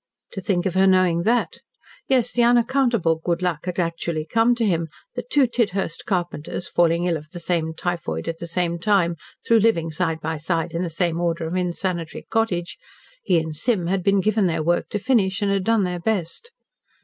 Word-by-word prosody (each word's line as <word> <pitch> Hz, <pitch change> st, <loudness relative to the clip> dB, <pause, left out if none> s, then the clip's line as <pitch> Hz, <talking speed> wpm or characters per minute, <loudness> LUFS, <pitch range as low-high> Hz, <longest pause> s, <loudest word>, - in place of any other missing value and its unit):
To 195 Hz, -, -6 dB
think 180 Hz, -1 st, 0 dB
of 190 Hz, -, 0 dB
her 190 Hz, +1 st, +4 dB
knowing 185 Hz, -3 st, +3 dB
that! 240 Hz, 0 st, 0 dB, 0.5 s
Yes, 250 Hz, -3 st, +2 dB
the 245 Hz, -, +2 dB
unaccountable 235 Hz, -7 st, +3 dB
good 175 Hz, 0 st, -1 dB
luck 175 Hz, -1 st, -2 dB
had 180 Hz, -, -3 dB
actually 165 Hz, -2 st, -2 dB
come 230 Hz, +7 st, +3 dB
to 235 Hz, -1 st, 0 dB
him 170 Hz, -5 st, 0 dB, 0.3 s
that -, -, -6 dB
two 285 Hz, -, +4 dB
Tidhurst 200 Hz, -8 st, -1 dB
carpenters, 175 Hz, -3 st, -2 dB
falling 170 Hz, 0 st, +2 dB
ill 170 Hz, -2 st, +1 dB
of 155 Hz, 0 st, -12 dB
the 175 Hz, +1 st, -8 dB
same 165 Hz, -2 st, -1 dB
typhoid 165 Hz, -, -3 dB
at 165 Hz, -, -3 dB
the 170 Hz, -, -6 dB
same 170 Hz, 0 st, -1 dB
time, 180 Hz, -3 st, +2 dB, 0.3 s
through 230 Hz, -1 st, +5 dB
living 170 Hz, -7 st, +2 dB
side 160 Hz, 0 st, -1 dB
by 160 Hz, 0 st, -3 dB
side 165 Hz, +2 st, -2 dB
in 165 Hz, -, -1 dB
the 180 Hz, -, -2 dB
same 170 Hz, 0 st, -1 dB
order 170 Hz, -1 st, -1 dB
of 160 Hz, -, -4 dB
unsanitary 180 Hz, -2 st, -2 dB
cottage, 190 Hz, -6 st, -1 dB, 0.4 s
he 185 Hz, -5 st, +2 dB
and 160 Hz, -1 st, -2 dB
Sim 205 Hz, +1 st, 0 dB
had 185 Hz, +2 st, 0 dB
been 195 Hz, +1 st, +3 dB
given 215 Hz, -1 st, +2 dB
their 160 Hz, -2 st, -1 dB
work 175 Hz, +2 st, 0 dB
to -, -, -2 dB
finish, 205 Hz, -3 st, +1 dB
and 200 Hz, -, +1 dB
had 195 Hz, -1 st, +1 dB
done 225 Hz, -2 st, +3 dB
their 180 Hz, -1 st, -2 dB
best. 205 Hz, -, -2 dB
180 Hz, 200 wpm, -23 LUFS, 165-205 Hz, 0.5 s, through